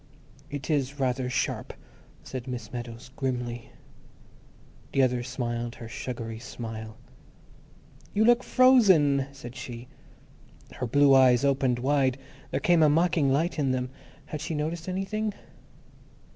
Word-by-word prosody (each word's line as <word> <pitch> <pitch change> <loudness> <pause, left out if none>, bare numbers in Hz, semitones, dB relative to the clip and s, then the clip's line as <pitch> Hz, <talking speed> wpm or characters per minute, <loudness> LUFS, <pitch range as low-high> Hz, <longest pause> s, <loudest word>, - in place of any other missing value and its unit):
"It 145 -1 -5
is 140 -1 -1
rather 130 -1 0
sharp," 125 - -2 0.5
said 130 -1 -7
Miss 120 -4 -6
Meadows, 120 0 -7
grimly. 125 -3 -3 1.2
The 135 - +4
other 125 -1 +1
smiled 120 -2 -3
her 115 - -9
sugary 115 -1 -6
smile. 110 -2 -7 1.1
"You 215 +1 +2
look 240 +1 +5
fro 255 0 +6
zen," 145 - +4
said 130 -3 -10
she. 120 -1 -8 0.8
Her 125 - -4
blue 140 +3 +5
eyes 130 -1 +6
opened 135 -3 +2
wide; 135 0 +1 0.3
there - - -1
came 175 -2 +3
a 155 - +6
mocking 160 -2 +3
light 160 +4 0
in 140 -2 +1
them. 125 0 -2 0.3
(Had 150 - -6
she 160 0 -3
noticed 160 +3 -3
anything?) 205 +3 -2
135 Hz, 130 wpm, -27 LUFS, 120-150 Hz, 1.2 s, fro